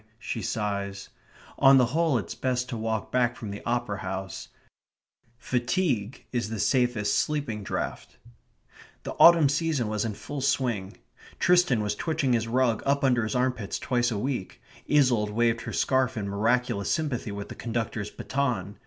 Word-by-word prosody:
she 115 0 -4
sighs. 100 -2 -3 0.5
On 135 0 +7
the 125 - +5
whole 160 -4 +2
it's 105 - -4
best 125 -1 -1
to 125 - -3
walk 110 -1 -3
back 120 -1 +2
from 105 -3 -7
the 100 - -7
Opera 120 -4 -1
House. 95 -2 -5 0.9
Fatigue 125 - -1
is 120 -3 -1
the 110 - -4
safest 120 -3 +1
sleeping 145 -8 -1
draught. - - -4 0.9
The - - -5
autumn 165 -3 +8
season 145 -5 0
was 105 -1 -1
in 110 -3 -3
full 135 +7 -6
swing. 125 -8 -1 0.4
Tristan 175 -11 +3
was 105 0 -1
twitching 155 0 0
his 115 -1 +1
rug 120 -1 +1
up 140 +1 +1
under 125 -3 +3
his 110 +1 -3
armpits 125 -5 -1
twice 120 -1 0
a 110 - -2
week; 125 -3 -3 0.3
Isolde 125 -8 +3
waved 115 0 +2
her - - -6
scarf 130 -2 +1
in 100 -2 -3
miraculous 105 +1 0
sympathy 130 -8 -1
with 100 0 -6
the - - -6
conductor's 115 -3 -3
baton. 120 -9 -2
120 Hz, 160 wpm, -27 LUFS, 105-130 Hz, 0.9 s, autumn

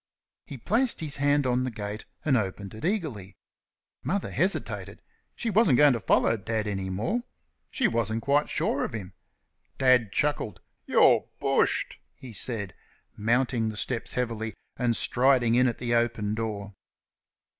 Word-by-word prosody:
He 140 - -7
placed 230 - +1
his 150 -3 -2
hand 145 0 +2
on 125 0 +1
the 130 - -1
gate, 105 -2 -6 0.2
and 145 -4 +3
opened 100 -3 -2
it 110 - -10
eagerly. 155 - -2 0.7
Mother 200 +1 -2
hesitated. 190 +4 -1 0.4
She 230 - -2
wasn't 190 - +4
going 145 -2 +6
to 115 - -2
follow 115 - +2
Dad 110 +1 -2
any 95 -2 -3
more. 115 - -1 0.5
She 240 - +1
wasn't 115 - -1
quite 145 +1 +2
sure 140 - 0
of - - -4
him. 95 -4 -6 0.6
Dad 125 -5 +4
chuckled. 145 -2 -1 0.3
"You're - - +4
bushed!" - - +1 0.2
he 125 -3 -11
said, 105 -5 -3 0.4
mounting 115 +1 +1
the 110 - -6
steps 115 +1 -1
heavily 115 -3 -3 0.2
and 120 -2 +1
striding 125 -2 +3
in 125 +2 +4
at 120 - -1
the 120 -1 -2
open 115 -3 +1
door. 105 -2 -4
120 Hz, 150 wpm, -27 LUFS, 110-140 Hz, 0.7 s, going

